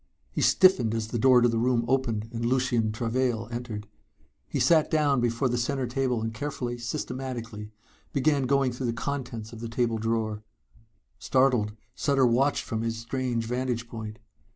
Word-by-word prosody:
He -, -, -2 dB
stiffened 125 Hz, -, +4 dB
as 110 Hz, -1 st, -2 dB
the 120 Hz, -, -2 dB
door 125 Hz, 0 st, +6 dB
to 120 Hz, -, +5 dB
the 115 Hz, -1 st, 0 dB
room 120 Hz, 0 st, +2 dB
opened 120 Hz, -5 st, 0 dB
and 115 Hz, 0 st, -3 dB
Lucien 120 Hz, -3 st, +1 dB
Travail 115 Hz, 0 st, -1 dB
entered. 115 Hz, -3 st, -5 dB, 0.6 s
He -, -, -2 dB
sat 160 Hz, -3 st, +4 dB
down 145 Hz, -5 st, +2 dB
before 120 Hz, +2 st, +1 dB
the 120 Hz, 0 st, 0 dB
center 135 Hz, +2 st, -1 dB
table 125 Hz, -2 st, -1 dB
and 115 Hz, 0 st, -3 dB
carefully, 120 Hz, -1 st, -4 dB
systematically 120 Hz, -4 st, -5 dB, 0.4 s
began 140 Hz, -1 st, +2 dB
going 135 Hz, -1 st, +2 dB
through 125 Hz, +1 st, -3 dB
the 115 Hz, -, 0 dB
contents 125 Hz, -3 st, -4 dB
of 115 Hz, -, -8 dB
the 115 Hz, 0 st, -5 dB
table 115 Hz, -1 st, 0 dB
drawer. 110 Hz, -1 st, -1 dB, 0.8 s
Startled, 125 Hz, -6 st, +2 dB, 0.2 s
Sutter 135 Hz, -1 st, +2 dB
watched 130 Hz, +4 st, +2 dB
from 110 Hz, -2 st, -3 dB
his 115 Hz, 0 st, -2 dB
strange 120 Hz, 0 st, -2 dB
vantage 125 Hz, 0 st, -2 dB
point. 110 Hz, -2 st, -7 dB
120 Hz, 165 wpm, -27 LUFS, 115-130 Hz, 0.8 s, door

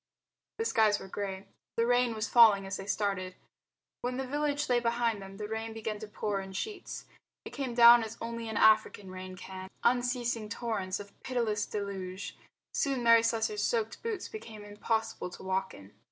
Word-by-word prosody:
The 450 Hz, -, -1 dB
skies 215 Hz, -, +4 dB
were -, -, -9 dB
grey. 195 Hz, 0 st, -4 dB, 0.3 s
The 230 Hz, -, +3 dB
rain 245 Hz, -1 st, +3 dB
was 220 Hz, +1 st, -2 dB
falling 215 Hz, -5 st, +6 dB
as 195 Hz, +1 st, -4 dB
they 195 Hz, -, -8 dB
started. 195 Hz, -3 st, -1 dB, 0.7 s
When 250 Hz, +1 st, -2 dB
the 265 Hz, -, -2 dB
village 290 Hz, +2 st, -1 dB
lay 245 Hz, -1 st, +3 dB
behind 235 Hz, -2 st, 0 dB
them 195 Hz, 0 st, -10 dB
the 210 Hz, 0 st, -4 dB
rain 220 Hz, +1 st, -4 dB
began 220 Hz, -1 st, -4 dB
to 215 Hz, -, -7 dB
pour 205 Hz, -1 st, -2 dB
in 190 Hz, 0 st, -9 dB
sheets. 410 Hz, -, -5 dB, 0.4 s
It -, -, -7 dB
came 260 Hz, -4 st, -4 dB
down 235 Hz, 0 st, +9 dB
as 225 Hz, 0 st, -7 dB
only 230 Hz, 0 st, -5 dB
an 220 Hz, -, -3 dB
African 215 Hz, -3 st, +4 dB
rain 185 Hz, 0 st, -7 dB
can, 185 Hz, 0 st, -8 dB
unceasing 240 Hz, -2 st, +1 dB
torrents 210 Hz, -5 st, -2 dB
of 200 Hz, 0 st, -10 dB
pitiless 230 Hz, -5 st, -1 dB
deluge. 195 Hz, -2 st, -5 dB, 0.4 s
Soon 270 Hz, -4 st, 0 dB
Mary 230 Hz, -1 st, +7 dB
Slessor's 230 Hz, -, 0 dB
soaked 460 Hz, -3 st, -1 dB
boots 445 Hz, -5 st, -3 dB
became 225 Hz, -, -9 dB
impossible 220 Hz, -1 st, -2 dB
to 180 Hz, -, -11 dB
walk 190 Hz, 0 st, -1 dB
in. 100 Hz, +1 st, -14 dB
220 Hz, 180 wpm, -31 LUFS, 195-240 Hz, 0.7 s, down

